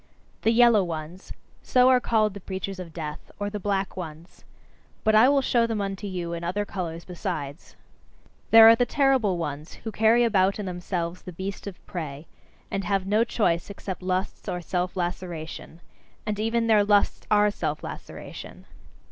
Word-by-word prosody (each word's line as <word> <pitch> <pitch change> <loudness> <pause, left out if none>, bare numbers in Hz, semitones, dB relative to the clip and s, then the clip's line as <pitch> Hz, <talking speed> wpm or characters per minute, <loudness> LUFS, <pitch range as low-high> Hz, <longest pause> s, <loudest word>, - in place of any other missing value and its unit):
"The - - +2
yellow 230 -3 +5
ones": 165 +2 -7 0.3
so 250 0 +4
are 255 -1 +6
called 215 -4 +1
the 200 - -8
preachers 190 0 -5
of 175 -3 -7
death, 155 -2 -7
or 205 0 -2
"the 210 - -4
black 195 -1 -1
ones." 165 -1 -9 0.6
But 220 - +3
I 220 +4 +7
will 280 -1 +3
show 235 -2 +2
them 225 -2 -2
unto 195 0 -3
you 175 -3 -4
in 170 0 -5
other 195 +4 -1
colours 170 -4 -5
besides. 170 -5 -6 0.7
There 225 0 +10
are 225 - +9
the 245 +1 +1
terrible 265 -9 +2
ones 150 -1 -5
who 220 - -4
carry 225 +3 +4
about 195 -4 +3
in 210 - -4
themselves 175 -1 -4
the 180 - -8
beast 190 +4 -6
of 195 - -9
prey, 155 -4 -6 0.5
and 195 - -2
have 195 -2 0
no 210 +3 +3
choice 175 -8 0
except 195 -2 -6
lusts 185 +1 -2
or 180 - -2
self 180 +1 -2
laceration. 175 -2 -5 0.4
And 210 -1 -2
even 230 +1 +1
their 215 -2 +5
lusts 205 0 +2
are 210 0 +4
self - - -3
laceration. - - -9
195 Hz, 175 wpm, -26 LUFS, 175-215 Hz, 0.7 s, There